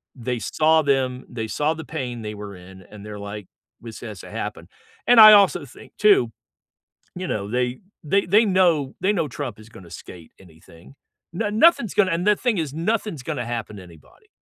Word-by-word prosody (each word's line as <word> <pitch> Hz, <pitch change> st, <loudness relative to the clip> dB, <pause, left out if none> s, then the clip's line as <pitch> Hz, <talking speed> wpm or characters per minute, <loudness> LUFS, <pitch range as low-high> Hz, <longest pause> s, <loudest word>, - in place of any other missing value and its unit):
they 125 Hz, -1 st, -4 dB
saw 160 Hz, +9 st, +2 dB
them, 130 Hz, -3 st, -1 dB
they 115 Hz, -2 st, -5 dB
saw 150 Hz, +7 st, -1 dB
the 160 Hz, -, -8 dB
pain 125 Hz, -7 st, -6 dB
they 105 Hz, 0 st, -6 dB
were 100 Hz, -1 st, -9 dB
in, 95 Hz, +1 st, -14 dB
and 105 Hz, -1 st, -12 dB
they're 105 Hz, -1 st, -8 dB
like, 100 Hz, -1 st, -8 dB, 0.3 s
"This 115 Hz, -1 st, -10 dB
has 110 Hz, -5 st, -9 dB
to -, -, -12 dB
happen," -, -, -6 dB, 0.4 s
and 245 Hz, -1 st, +6 dB
I 215 Hz, -1 st, +11 dB
also 200 Hz, -7 st, +4 dB
think 125 Hz, -, -16 dB
too, 200 Hz, -, +4 dB, 0.8 s
you 185 Hz, 0 st, -5 dB
know, 100 Hz, -8 st, -3 dB
they 125 Hz, +1 st, -2 dB, 0.2 s
they 195 Hz, +7 st, +1 dB
they 205 Hz, +6 st, +4 dB
know 175 Hz, -9 st, +1 dB
they 195 Hz, +3 st, +2 dB
know 165 Hz, -6 st, -1 dB
Trump 125 Hz, -5 st, -6 dB
is 110 Hz, -, -15 dB
gonna 95 Hz, -5 st, -14 dB
skate 85 Hz, -3 st, -12 dB
anything. 85 Hz, -, -18 dB, 0.4 s
No 205 Hz, +5 st, -2 dB
nothing's 230 Hz, -, +3 dB
gonna 200 Hz, -3 st, +2 dB
and 170 Hz, +2 st, -1 dB
the 210 Hz, -, +5 dB
thing 235 Hz, -4 st, -1 dB
is, 150 Hz, -4 st, -3 dB
nothing's 185 Hz, -, -2 dB
gonna 135 Hz, -6 st, -4 dB
happen 115 Hz, -3 st, -5 dB
to 95 Hz, -, -10 dB
anybody. 85 Hz, -5 st, -19 dB
130 Hz, 195 wpm, -22 LUFS, -, 0.8 s, I